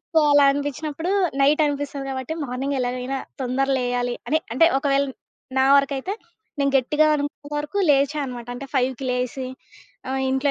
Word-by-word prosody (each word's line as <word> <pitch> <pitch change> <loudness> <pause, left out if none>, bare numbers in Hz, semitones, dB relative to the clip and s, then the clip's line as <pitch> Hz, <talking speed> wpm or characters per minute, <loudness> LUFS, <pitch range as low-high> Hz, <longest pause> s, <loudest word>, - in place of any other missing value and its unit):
So, - - +6
అలా 285 -1 +6
అనిపించినప్పుడు 290 +4 -3 0.3
night 295 +3 +4
అనిపిస్తది 285 -1 -3
గాబట్టి, 260 +3 -4
మార్నింగ్ 270 +2 -2
ఎలాగైనా 250 +2 -2 0.2
తొందర 260 +2 0
లేయాలి 245 -1 -1
అని 315 - +3 0.2
అంటే 330 - +6
ఒకవేళ 275 -1 +2 0.6
నా 265 - +5
వరకైతే 280 +6 0 0.5
నేను 275 0 +2
గట్టిగా 300 +4 +3
అనుకున్నంత 290 0 -4
వరకు 300 +7 -3
లేచా 285 +2 +2
అనమాట. 245 -3 -7
అంటే 275 +3 -7
5:00కి 260 0 0
లేసి 250 +1 -2 0.6
ఆహ్, 265 0 -1
ఇంట్లో 265 +2 +1
275 Hz, 150 wpm, -23 LUFS, 255-290 Hz, 0.6 s, So